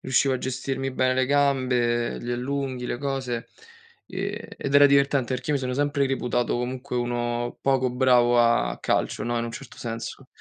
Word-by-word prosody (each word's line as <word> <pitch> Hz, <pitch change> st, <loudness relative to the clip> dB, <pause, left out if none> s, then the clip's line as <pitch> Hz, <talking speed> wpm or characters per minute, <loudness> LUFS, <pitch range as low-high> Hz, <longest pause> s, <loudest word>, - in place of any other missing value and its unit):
riuscivo 130 Hz, +1 st, +2 dB
a 130 Hz, -, -2 dB
gestirmi 135 Hz, +1 st, -3 dB
bene 130 Hz, 0 st, +1 dB
le 130 Hz, 0 st, +2 dB
gambe, 130 Hz, -4 st, +1 dB
gli 120 Hz, -, -5 dB
allunghi, 130 Hz, 0 st, -3 dB
le 120 Hz, -, -3 dB
cose, 130 Hz, -4 st, -3 dB, 0.6 s
e -, -, -5 dB
ed 140 Hz, -, -3 dB
era 145 Hz, 0 st, +8 dB
divertente 140 Hz, -2 st, +3 dB
perché 125 Hz, +1 st, -6 dB
io 150 Hz, -, +2 dB
mi 135 Hz, -, -3 dB
sono 125 Hz, 0 st, -2 dB
sempre 145 Hz, 0 st, +1 dB
reputato 125 Hz, -2 st, 0 dB
comunque 125 Hz, 0 st, -4 dB
uno 120 Hz, 0 st, -2 dB
poco 135 Hz, -1 st, +2 dB
bravo 125 Hz, -1 st, +4 dB
a 115 Hz, 0 st, +3 dB
calcio, -, -, -1 dB
no, 120 Hz, 0 st, -1 dB
in 115 Hz, -, -1 dB
un 115 Hz, -, -4 dB
certo 120 Hz, +1 st, -10 dB
senso. 115 Hz, +3 st, -6 dB
130 Hz, 180 wpm, -25 LUFS, 120-135 Hz, 0.6 s, era